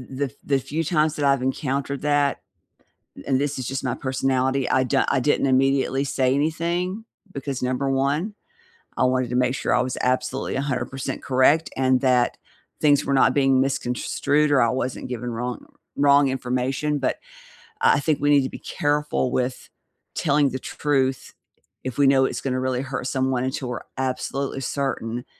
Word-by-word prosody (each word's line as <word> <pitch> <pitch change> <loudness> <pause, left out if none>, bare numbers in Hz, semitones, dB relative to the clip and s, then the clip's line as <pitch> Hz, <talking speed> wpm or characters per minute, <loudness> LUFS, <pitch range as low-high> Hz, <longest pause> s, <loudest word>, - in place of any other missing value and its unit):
the 140 - 0
f 130 - -7
the 140 -1 +2
few 150 +5 -3
times 155 -1 +1
that 145 - -1
I've 140 -2 +3
encountered 135 +1 -2
that 145 -1 +1 0.8
and 135 -1 +1
this 145 0 -1
is 130 - -4
just 135 0 -3
my 125 -1 -1
personality, 130 0 0
I 130 - +3
di 125 - +1
I 135 - +2
didn't 140 +1 +1
immediately 135 +1 +2
say 130 -1 +1
anything 170 +7 -1 0.3
because, 140 -1 -4
number 130 +2 0
1, 145 +10 0 0.6
I - - +2
wanted 130 -1 +1
to 125 - -3
make 125 +1 +2
sure - - -1
I 120 - +3
was 125 0 -3
absolutely 130 +1 -1
100% 135 -1 -3
correct 140 +5 +3
and 130 0 +2
that 125 -2 +2 0.4
things 145 -2 +4
were 140 - 0
not 135 -1 +4
being 135 -2 +4
misconstrued 140 +3 0
or 140 - +4
I 115 - +3
wasn't 130 +1 -3
given 125 0 -4
wrong 120 +1 -4 0.3
wrong 140 -1 +4
information, 130 +3 -1
but 135 -2 0 0.7
I - - +5
I - - +1
think 150 0 0
we 145 - +2
need 145 -2 +5
to 130 - -3
be - - -17
careful 145 -3 -1
with 125 0 -2 0.5
telling 145 -2 +2
the 130 - -4
truth 135 -3 -1 0.5
if 130 -2 -5
we 140 -1 +4
know 135 -1 +5
it's - - -1
gonna 130 -1 -1
really 130 -1 -1
hurt 135 -1 -4
someone 130 -2 0
until 130 0 -3
we're 125 -1 -4 0.2
absolutely 135 +1 -2
certain 125 -3 -3
135 Hz, 175 wpm, -23 LUFS, 130-145 Hz, 0.8 s, I